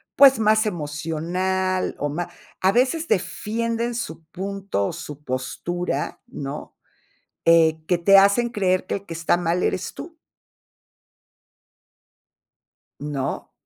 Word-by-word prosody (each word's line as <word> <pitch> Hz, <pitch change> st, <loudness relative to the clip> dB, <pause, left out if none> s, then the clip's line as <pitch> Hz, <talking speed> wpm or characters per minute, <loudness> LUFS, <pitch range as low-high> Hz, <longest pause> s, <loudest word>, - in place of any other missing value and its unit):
pues, 270 Hz, -2 st, +8 dB
más 215 Hz, 0 st, +4 dB
emocional 180 Hz, +3 st, -1 dB
o 145 Hz, -, -1 dB
ma 170 Hz, +4 st, -3 dB, 0.3 s
a 190 Hz, -, +4 dB
veces 270 Hz, +8 st, +1 dB
defienden 230 Hz, -, -1 dB
su 160 Hz, -9 st, -5 dB
punto 190 Hz, -, -3 dB
o -, -, -4 dB
su 150 Hz, 0 st, -8 dB
postura, 145 Hz, +5 st, -3 dB
¿no?, 140 Hz, +1 st, -7 dB, 0.7 s
eh, 160 Hz, -1 st, +5 dB
que 180 Hz, -, +3 dB
te 195 Hz, +3 st, +6 dB
hacen 200 Hz, +5 st, +5 dB
creer 185 Hz, -5 st, 0 dB
que -, -, -1 dB
el 200 Hz, 0 st, -6 dB
que 170 Hz, -, -7 dB
está 165 Hz, +1 st, +1 dB
mal 175 Hz, +1 st, 0 dB
eres 185 Hz, 0 st, -1 dB
tú. 330 Hz, 0 st, -9 dB, 2.8 s
¿No? 140 Hz, -2 st, -3 dB
185 Hz, 120 wpm, -23 LUFS, 160-210 Hz, 2.8 s, pues